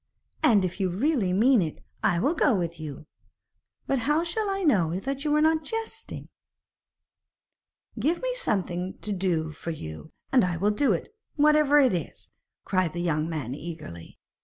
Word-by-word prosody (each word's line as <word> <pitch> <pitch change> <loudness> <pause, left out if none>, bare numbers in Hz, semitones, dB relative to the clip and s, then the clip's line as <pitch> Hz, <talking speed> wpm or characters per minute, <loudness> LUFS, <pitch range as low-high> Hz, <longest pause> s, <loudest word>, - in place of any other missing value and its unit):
'And, 205 -5 +4
if 185 +2 -5
you 190 -2 +1
really 215 - +1
mean 230 +5 +4
it, 160 -3 -3 0.2
I 175 - +2
will 280 - +2
go 295 -7 +3
with 170 -3 -3
you. 150 -1 -7 0.8
But 270 - 0
how 295 +7 +1
shall 405 +5 -2
I 390 0 -1
know 185 - +2
that 275 +5 -4
you 300 -1 +2
are 300 - +3
not 315 0 +3
jesting?' 450 +7 -6 1.7
'Give 335 +4 +1
me - - -2
something 185 - -2
to 210 - -3
do 175 -5 0
for 155 +2 -7
you, 80 - -7 0.2
and 260 -4 +5
I 180 -2 0
will 205 +5 +2
do 275 +7 +2
it, - - -2 0.2
whatever 300 -1 +5
it 260 -6 +4
is,' 170 -4 -5 0.3
cried 185 -4 0
the 175 - -4
young 160 -2 0
man 145 -7 -3
eagerly. 150 - -8
195 Hz, 170 wpm, -26 LUFS, -, 1.7 s, and